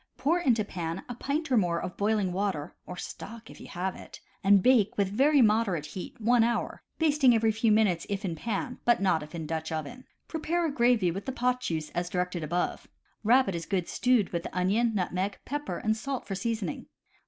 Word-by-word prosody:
Pour 335 Hz, +5 st, +2 dB
into 235 Hz, -10 st, +2 dB
pan 170 Hz, -2 st, -4 dB
a 245 Hz, -, -5 dB
pint 285 Hz, +5 st, -3 dB
or 250 Hz, -, +4 dB
more 175 Hz, -4 st, +2 dB
of 180 Hz, -, -5 dB
boiling 205 Hz, -3 st, +1 dB
water 190 Hz, -6 st, -2 dB
(or 180 Hz, -, -7 dB
stock, 230 Hz, +4 st, -8 dB
if -, -, -13 dB
you -, -, -10 dB
have 185 Hz, +2 st, -3 dB
it), -, -, -11 dB, 0.2 s
and 195 Hz, -1 st, +5 dB
bake 240 Hz, -6 st, +4 dB
with 200 Hz, -2 st, +2 dB
very 275 Hz, +6 st, +4 dB
moderate 210 Hz, -8 st, +2 dB
heat, 180 Hz, +8 st, -8 dB
one 235 Hz, +1 st, +4 dB
hour, 235 Hz, 0 st, -1 dB, 0.2 s
basting 295 Hz, -6 st, +4 dB
every 225 Hz, 0 st, +3 dB
few 225 Hz, +1 st, +1 dB
minutes 210 Hz, -6 st, +2 dB
if 200 Hz, +1 st, -2 dB
in 175 Hz, -, -1 dB
pan, 225 Hz, +7 st, -3 dB
but 240 Hz, -, +4 dB
not 185 Hz, -5 st, +2 dB
if 150 Hz, +3 st, -9 dB
in 160 Hz, -2 st, -4 dB
Dutch 160 Hz, +1 st, -3 dB
oven. 240 Hz, -, -5 dB, 0.2 s
Prepare 335 Hz, +2 st, -1 dB
a 315 Hz, -, 0 dB
gravy 235 Hz, -8 st, +3 dB
with 195 Hz, +7 st, -6 dB
the -, -, 0 dB
pot 250 Hz, 0 st, 0 dB
juice, 160 Hz, -9 st, -3 dB
as 175 Hz, 0 st, -2 dB
directed 180 Hz, -2 st, -2 dB
above. 175 Hz, +4 st, -2 dB, 0.4 s
Rabbit 240 Hz, -2 st, +4 dB
is 170 Hz, -1 st, -5 dB
good 185 Hz, -4 st, -1 dB
stewed 245 Hz, -6 st, +2 dB
with 170 Hz, -1 st, -2 dB
onion, 210 Hz, +6 st, +1 dB
nutmeg, 190 Hz, +1 st, -1 dB
pepper 290 Hz, +2 st, -3 dB
and 220 Hz, -2 st, 0 dB
salt 265 Hz, +3 st, -4 dB
for 195 Hz, -, -4 dB
seasoning. 205 Hz, -2 st, -3 dB
210 Hz, 205 wpm, -28 LUFS, 180-245 Hz, 0.4 s, and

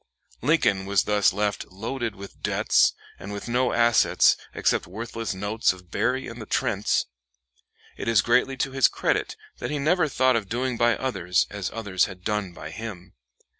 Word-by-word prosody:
Lincoln 105 Hz, -12 st, +2 dB
was 100 Hz, -1 st, +3 dB
thus 105 Hz, -1 st, +3 dB
left 105 Hz, +1 st, -2 dB
loaded 115 Hz, +3 st, -4 dB
with 100 Hz, 0 st, -11 dB
debts, -, -, +3 dB, 0.3 s
and 100 Hz, -, -8 dB
with 100 Hz, +2 st, -6 dB
no 125 Hz, +1 st, +1 dB
assets 115 Hz, -1 st, +4 dB, 0.2 s
except -, -, 0 dB
worthless 115 Hz, +2 st, -5 dB
notes 105 Hz, +2 st, +1 dB
of 90 Hz, -1 st, -16 dB
Berry 125 Hz, +5 st, 0 dB
and 115 Hz, 0 st, -8 dB
the 110 Hz, -, -8 dB
Trents. -, -, 0 dB, 0.9 s
It -, -, -5 dB
is 115 Hz, -3 st, +4 dB
greatly 125 Hz, +3 st, +2 dB
to 135 Hz, -, -1 dB
his 135 Hz, -1 st, +4 dB
credit -, -, -1 dB, 0.2 s
that -, -, -4 dB
he 150 Hz, -, -2 dB
never 155 Hz, +4 st, +2 dB
thought 130 Hz, -2 st, +2 dB
of 105 Hz, -4 st, -2 dB
doing 125 Hz, +2 st, -1 dB
by 120 Hz, 0 st, +2 dB
others 90 Hz, -9 st, 0 dB
as 100 Hz, -2 st, -3 dB
others 100 Hz, -5 st, 0 dB
had 90 Hz, -2 st, -10 dB
done 105 Hz, -3 st, -1 dB
by 75 Hz, -2 st, -9 dB
him. 100 Hz, -3 st, -8 dB
110 Hz, 170 wpm, -25 LUFS, 100-125 Hz, 0.9 s, assets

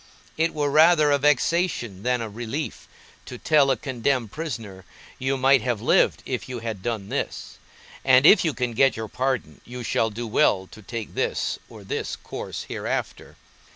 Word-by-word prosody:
It 165 Hz, +1 st, 0 dB
were 145 Hz, -2 st, 0 dB
rather 155 Hz, 0 st, +5 dB
a 140 Hz, -, +3 dB
vexation 145 Hz, -, +1 dB
than 125 Hz, +1 st, 0 dB
a 115 Hz, -, -3 dB
relief, 120 Hz, +8 st, -5 dB, 0.4 s
to 125 Hz, -, -7 dB
tell 145 Hz, 0 st, +3 dB
a 130 Hz, -, +2 dB
condemned 125 Hz, -2 st, -1 dB
prisoner, 115 Hz, -, -6 dB, 0.4 s
You 135 Hz, +1 st, 0 dB
might 135 Hz, 0 st, +4 dB
have 120 Hz, -1 st, -1 dB
lived -, -, +2 dB
if -, -, -4 dB
you 125 Hz, -, -4 dB
had 110 Hz, -4 st, -5 dB
done 105 Hz, -2 st, -3 dB
this; -, -, -4 dB, 0.4 s
and 130 Hz, +1 st, +5 dB
if 205 Hz, -, +7 dB
you 160 Hz, -4 st, 0 dB
can 125 Hz, -2 st, -1 dB
get 135 Hz, +3 st, +3 dB
your 110 Hz, 0 st, -4 dB
pardon, 130 Hz, +3 st, -2 dB
you 125 Hz, 0 st, -8 dB
shall 115 Hz, 0 st, +1 dB
do 115 Hz, +3 st, -6 dB
well 105 Hz, -5 st, +2 dB
to 110 Hz, -, -12 dB
take 115 Hz, +1 st, -6 dB
this -, -, -1 dB
or -, -, -12 dB
this -, -, -3 dB
course -, -, -7 dB
hereafter. -, -, -4 dB
125 Hz, 175 wpm, -24 LUFS, 115-145 Hz, 0.4 s, if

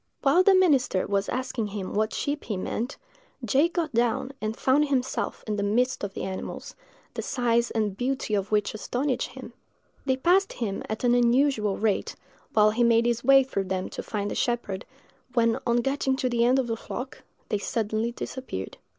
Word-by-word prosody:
While 285 Hz, +6 st, +5 dB
the 385 Hz, +1 st, +6 dB
minister 285 Hz, -, +3 dB
was 200 Hz, -1 st, 0 dB
asking 250 Hz, -3 st, -2 dB
him 200 Hz, -2 st, -5 dB
what 215 Hz, +1 st, +1 dB
sheep 290 Hz, +1 st, -3 dB
he 210 Hz, -, -2 dB
meant, 230 Hz, +7 st, -3 dB, 0.5 s
J—— 270 Hz, +8 st, +4 dB
got 335 Hz, -4 st, -2 dB
down 235 Hz, +2 st, +1 dB
and 215 Hz, +1 st, -3 dB
found 285 Hz, +3 st, +3 dB
himself 265 Hz, -2 st, -1 dB
in 210 Hz, -1 st, -2 dB
the -, -, -1 dB
midst 245 Hz, +6 st, +1 dB
of 195 Hz, -1 st, -4 dB
the -, -, -4 dB
animals, 190 Hz, 0 st, -6 dB, 0.4 s
the -, -, -3 dB
size 235 Hz, -2 st, +1 dB
and 215 Hz, -3 st, -1 dB
beauty 250 Hz, -1 st, -2 dB
of 200 Hz, 0 st, 0 dB
which 210 Hz, -1 st, +1 dB
astonished 250 Hz, +5 st, -2 dB
him. -, -, -10 dB, 0.5 s
They 260 Hz, -1 st, +1 dB
passed 365 Hz, +8 st, +3 dB
him 210 Hz, -5 st, -3 dB
at 215 Hz, +2 st, -4 dB
an 245 Hz, -1 st, +4 dB
unusual 245 Hz, -3 st, +3 dB
rate, 215 Hz, -2 st, 0 dB, 0.4 s
while 215 Hz, -1 st, +5 dB
he 240 Hz, +3 st, +1 dB
made 235 Hz, 0 st, +4 dB
his 235 Hz, -1 st, 0 dB
way 270 Hz, +1 st, +7 dB
through 200 Hz, -7 st, -3 dB
them 185 Hz, 0 st, -2 dB
to -, -, -5 dB
find 205 Hz, -2 st, -3 dB
the -, -, -3 dB
shepherd, 235 Hz, -6 st, -1 dB, 0.5 s
when, 230 Hz, -1 st, +3 dB
on 240 Hz, 0 st, +3 dB
getting 270 Hz, +1 st, 0 dB
to 260 Hz, -1 st, -1 dB
the 235 Hz, -1 st, +2 dB
end 255 Hz, +2 st, +4 dB
of 265 Hz, -, +1 dB
the 230 Hz, -1 st, -2 dB
flock, 260 Hz, +4 st, -7 dB, 0.3 s
they 210 Hz, -, 0 dB
suddenly 220 Hz, +2 st, -1 dB
disappeared. 240 Hz, -, -6 dB
235 Hz, 190 wpm, -26 LUFS, 210-265 Hz, 0.5 s, way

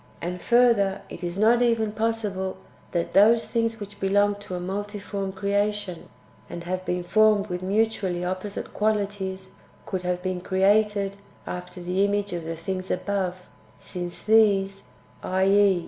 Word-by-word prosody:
And 180 Hz, +1 st, -4 dB
further, 215 Hz, -5 st, +3 dB
it 175 Hz, -, -9 dB
is 175 Hz, +1 st, -3 dB
not 230 Hz, +3 st, +4 dB
even 230 Hz, -3 st, +2 dB
possible 210 Hz, -4 st, -2 dB, 0.3 s
that 170 Hz, -1 st, -2 dB
those 225 Hz, +3 st, +6 dB
things 230 Hz, -1 st, -1 dB
which 205 Hz, 0 st, -9 dB
belong 205 Hz, +1 st, +3 dB
to 185 Hz, -2 st, -6 dB
a -, -, -3 dB
multiform 200 Hz, +1 st, -4 dB
creation, 200 Hz, -1 st, -1 dB, 0.4 s
and 170 Hz, -, -6 dB
have 185 Hz, +1 st, -3 dB
been 180 Hz, 0 st, -1 dB
formed 215 Hz, +2 st, +3 dB
with 180 Hz, 0 st, -3 dB
mutually 195 Hz, -3 st, 0 dB
opposite 185 Hz, +3 st, -4 dB
qualities, 200 Hz, -3 st, -1 dB, 0.4 s
[could 190 Hz, -2 st, -3 dB
have 180 Hz, 0 st, -2 dB
been 185 Hz, -1 st, -2 dB
created] 200 Hz, +1 st, +2 dB, 0.3 s
after 90 Hz, -, -6 dB
the 180 Hz, +2 st, +1 dB
image 205 Hz, -1 st, 0 dB
of 170 Hz, -2 st, -4 dB
the 165 Hz, 0 st, -3 dB
things 185 Hz, +2 st, -4 dB
above, 185 Hz, -1 st, -2 dB, 0.3 s
since 175 Hz, -2 st, -6 dB
these 200 Hz, -3 st, +3 dB, 0.4 s
{i.e. 195 Hz, 0 st, +3 dB
195 Hz, 145 wpm, -25 LUFS, 185-210 Hz, 0.4 s, those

